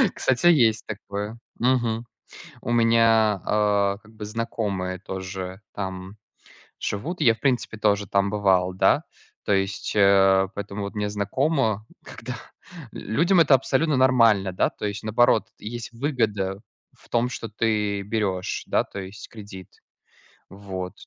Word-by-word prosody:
Кстати, 130 +6 +1
есть 120 -9 +4
такое. 105 +1 -5 0.2
Мгм. 120 -2 +1 0.6
У 120 - -4
меня, 115 -3 +4
а, 100 -1 +2
как 110 - -18
бы 110 -1 -7
знакомые 105 -5 -3
тоже 95 0 -6
там 95 0 -6 0.6
живут. 150 - -4
И - - +2
я, 115 -2 +6
в - - -26
принципе, 125 -4 0
тоже 105 -1 +1
там 100 0 +1
бывал, 95 -3 +2
да. 95 - +3 0.4
То - - -1
есть, 95 0 -1
э, 95 -1 +5
поэтому 100 0 -5
вот 100 +2 -6
мне 105 -1 -1
знакомо, 110 - 0 0.2
когда 125 +1 -7 0.6
людям 170 - +2
это 150 -3 +5
абсолютно 135 +2 +1
нормально, 115 -7 +4
да. - - +2
То - - -7
есть, 100 +1 -4
наоборот, 110 0 +3
есть 120 +3 -6
выгода 110 -7 -1 0.3
в - - -24
том, 120 +1 +1
что 115 -3 -6
ты 105 -2 0
берешь, 100 -3 -2
да, - - +2
то 100 - -8
есть, 95 +2 -9
кредит. 100 -4 -11 0.8
Вот. 95 -2 -6
105 Hz, 140 wpm, -24 LUFS, 100-115 Hz, 0.8 s, я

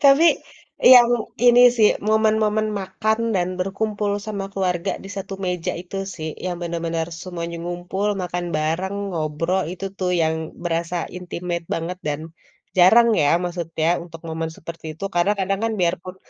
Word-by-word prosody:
Tapi 280 +4 +7 0.7
yang 245 -1 +9 0.4
ini 245 0 +7 0.2
sih, 215 -2 +6
momen-momen 215 0 +2
makan 220 +3 -1 0.2
dan 180 -1 +1
berkumpul 205 +2 -1 0.2
sama 200 -2 -3
keluarga 185 -1 -1
di 195 - -8
satu 195 0 -5
meja 180 -2 -1
itu 180 +2 -8 0.2
sih, 160 -1 -5 0.2
yang 180 -1 -2
bener-bener 165 -1 -2 0.2
semuanya 170 -2 -5
ngumpul, 175 +3 -3 0.2
makan 175 0 -3
bareng, 165 +6 -1 0.2
ngobrol, 165 +4 0
itu 185 +1 -7
tuh 180 -1 0
yang 160 0 +2 0.3
berasa 170 0 -1 0.2
intimate 175 -1 -4
banget 170 +2 -4
dan 145 0 -1 0.6
jarang 225 +7 +7
ya 145 - +3 0.2
maksudnya 165 -2 -2 0.2
untuk 165 -2 -11
momen 160 0 -3
seperti 165 0 -9
itu, 165 +6 -8
karna 175 +4 +3
kadang 195 +1 0
kan 225 - 0
biar 175 0 +3
pun 185 0 -8
180 Hz, 150 wpm, -22 LUFS, 170-200 Hz, 0.7 s, yang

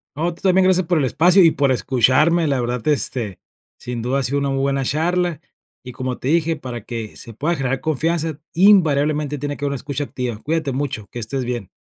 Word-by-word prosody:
No, 170 +3 -1
tú 170 - -14
también 190 -1 +4
gracias 185 -1 +3
por 175 -2 +2
el 140 - +2
espacio 180 +8 +5
y 165 - +6
por 140 -3 +1
escucharme, 135 +7 +3
la 135 -3 +1
verdad, 120 -1 -3
este, 125 - 0 0.4
sin 120 -1 -5
duda 130 +4 0
ha - - -1
sido 140 +3 +1
una 140 -1 -1
muy 135 0 -1
buena 135 0 0
charla, 170 +3 0 0.4
y 125 - -8
como 130 0 -4
te - - -6
dije, 165 0 +2
para 125 -5 -7
que 115 -3 -6
se 115 -2 -9
pueda 160 +9 -1
generar 135 -2 -2
confianza, 160 0 -1
invariablemente 150 -6 +3
tiene 145 +1 -4
que - - -9
haber 140 - 0
una - - -2
escucha 140 +2 -4
activa. 125 -5 -4
Cuídate 155 -2 -1
mucho, 130 -6 -3
que 120 - -6
estés 125 +3 -3
bien. 120 -6 -4
140 Hz, 220 wpm, -20 LUFS, 125-165 Hz, 0.4 s, y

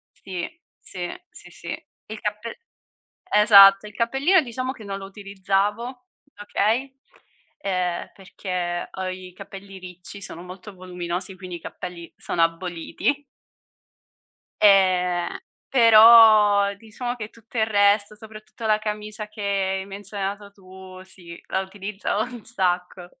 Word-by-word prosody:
Sì, 185 -3 -5 0.3
sì, 175 -1 -6 0.2
sì, - - -14
sì. - - -8 0.2
Il 215 0 -7
cappel 210 +2 -4 0.8
esatto, 200 -1 +8
il 210 - -13
cappellino 275 +10 +3
diciamo 255 0 -4
che 225 - -11
non 195 -1 -5
lo 195 - -8
utilizzavo, 205 +5 -2 0.4
okay, 235 +6 -1 0.6
ehm, 180 -6 -2
perché 180 -2 -4
ho 190 -1 -5
i 185 -1 -7
capelli 195 +1 -11
ricci, 180 +2 -10
sono 170 -3 -6
molto 185 +3 -11
voluminosi, 180 0 -5
quindi 180 -1 -8
i - - -8
capelli 175 -2 -8
sono 170 - -2
aboliti. 175 - -2 1.4
Ehm, 185 -3 +3 0.3
però 215 -4 +7
diciamo 240 +4 -6
che 215 -2 -7
tutto 230 +1 -13
il 220 - +3
resto, 205 0 +2
soprattutto 220 +1 -11
la 215 -1 +3
camicia 210 0 -5
che 210 -1 -10
hai 195 -1 -1
menzionato 200 0 -6
tu, 185 -1 -13
sì, 175 -2 -12
la 190 - -1
utilizzavo 200 +2 -3
un 240 -2 -9
sacco. 180 -4 -2
200 Hz, 125 wpm, -23 LUFS, 185-215 Hz, 1.4 s, esatto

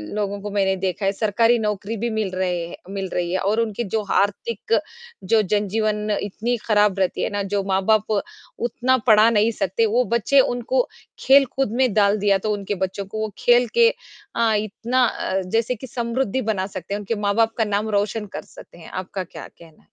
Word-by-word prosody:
लोगों 205 -1 -2
को 205 - -5
मैंने 195 -1 +1
देखा 190 +1 -2
है, 195 - +3
सरकारी 225 +3 +2
नौकरी 210 +1 -2
भी 235 +3 -2
मिल 220 -3 -1
रही 180 -2 -1
है - - -8
मिल 195 -1 -4
रही 175 -1 -1
है 185 - 0
और 210 +4 +1
उनके 225 +1 -2
जो 220 - +2
आर्थिक 210 - 0 0.5
जो 215 +4 +3
जनजीवन 210 +1 -1
इतनी 225 +4 -2
खराब 205 -2 +3
रहती 185 - 0
है - - 0
ना, 205 -1 -2
जो 200 0 -1
माँ-बाप 205 +3 +2 0.5
उतना 255 +2 +1
पढ़ा 215 +1 +7
नहीं 220 0 +3
सकते, 210 +2 0
वो 235 +4 +2
बच्चों 235 +4 +2 0.3
को - - +2 0.3
खेल-कूद 270 -3 +3
में 255 -5 +2
डाल 205 0 +3
दिया 200 -1 +3
तो 215 +2 -2
उनके 205 0 -3
बच्चे 195 +2 -6
को 215 +2 -4
खेल 240 0 +4
के 465 0 +7 0.5
अ, 230 -2 +2
इतना 230 +4 0
अ, 190 -4 -1
जैसे 225 +6 -1
कि 260 +4 -9
समृद्धि 240 +1 -1
बना 205 -4 -1
सकते 190 0 -7
हैं, 205 - -2
उनके 210 +3 -3
माँ-बाप 225 +2 +2
का 225 - +3
नाम 210 +1 -1
रोशन 210 +1 -3
कर - - -4
सकते - - -14
हैं। 165 - -12
आपका 185 +1 -4
क्या - - -10
कहना 165 -2 -17
है? - - -31
210 Hz, 195 wpm, -22 LUFS, 195-230 Hz, 0.5 s, पढ़ा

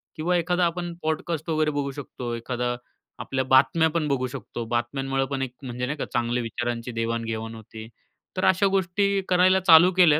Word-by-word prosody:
किंवा 175 +3 +1
एखादा 175 +1 +1
आपण 175 0 -2
पॉडकास्ट 160 +1 -2
वगैरे 155 -1 +1
बघू 145 -1 -2
शकतो, 130 -3 -6
एखादा 120 +1 -2 0.4
आपल्या 130 -1 -2
बातम्या 135 +5 +4
पण 160 -1 -1
बघू 130 -3 0
शकतो. 125 -2 -6
बातम्यांमुळे 135 +3 -1
पण 135 -1 -2
एक 130 -2 -3
म्हणजे 125 -1 -4
नाही 150 +4 -3
का, - - -3
चांगल्या 120 0 0
विचारांची 120 +1 -3
देवाण-घेवाण 115 -1 -3
होते. 110 0 -10 0.5
तर 185 - +1
अशा 190 +2 +4
गोष्टी 195 +1 +1
करायला 185 +1 +5
चालू 170 +2 +8
केल्या. 155 -5 +6
135 Hz, 170 wpm, -25 LUFS, 120-170 Hz, 0.5 s, चालू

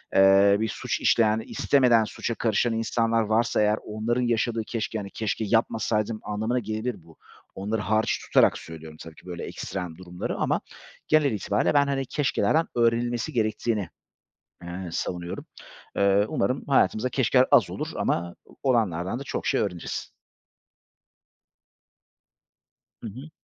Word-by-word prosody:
eee, 95 +1 +6
bir 110 0 0
suç - - -3
işleyen, 110 -1 +3
istemeden 125 -5 +3
suça 115 +2 -4
karışan 115 +1 +1
insanlar 115 0 +1
varsa 110 +1 +1
eğer 105 +1 +3
onların 110 +3 -1
yaşadığı 115 -1 0
keşke 110 -1 -3
hani 100 -2 -5
keşke 110 0 -2
yapmasaydım 110 0 0
anlamına 110 +4 -1
gelebilir 110 -1 -4
bu. 80 -1 -19 0.4
Onları 105 +3 -2
hariç 110 +3 +1
tutarak - - +4
söylüyorum 80 -1 -10
tabii 80 -1 -10
ki - - -18
böyle 90 -2 -6
ekstrem 90 -4 -6
durumları 90 -1 -5
ama - - 0 0.5
genel 155 -3 +4
itibârıyla 105 +3 0
ben 140 -1 +4
hani 135 -1 -1
keşkelerden 145 +3 +1
öğrenilmesi 120 0 +1
gerektiğini, 110 -3 -1 0.8
eee, 90 +1 -6
savunuyorum. 85 0 -4 0.5
Eee, 100 +1 +4
umarım 130 +2 -1
hayatımızda 130 -3 +3
keşkeler 130 0 +3
az - - +5
olur - - -4
ama 85 0 -1 0.3
olanlardan 110 -6 +1
da 140 - -7
çok - - -4
şey - - +2
öğreniriz. 90 -4 -4 2.9
Hı - - -4
hı. 130 +9 -10
110 Hz, 135 wpm, -26 LUFS, 100-120 Hz, 2.9 s, eee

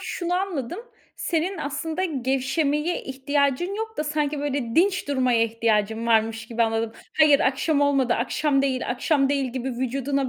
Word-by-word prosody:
şunu 360 -1 -3
anladım. 360 - -2 0.4
Senin 345 +3 -1
aslında 310 +4 -3
gevşemeye 285 +2 0
ihtiyacın 280 +6 0
yok 445 +1 -4
da 300 - -1
sanki 295 -1 -1
böyle, 280 -5 -2
dinç 370 -1 +2
durmaya 255 -4 +2
ihtiyacın 225 0 0
varmış 225 0 +1
gibi 235 -1 0
anladım. 225 0 0 0.3
Hayır, 300 -2 +6
akşam 280 +3 +1
olmadı, 275 -4 +2
akşam 275 +3 +1
değil, 260 -2 -1
akşam 275 +3 +1
değil 275 -3 0
gibi 260 0 -3
vücuduna 265 +2 -1
275 Hz, 145 wpm, -24 LUFS, 245-305 Hz, 0.4 s, Hayır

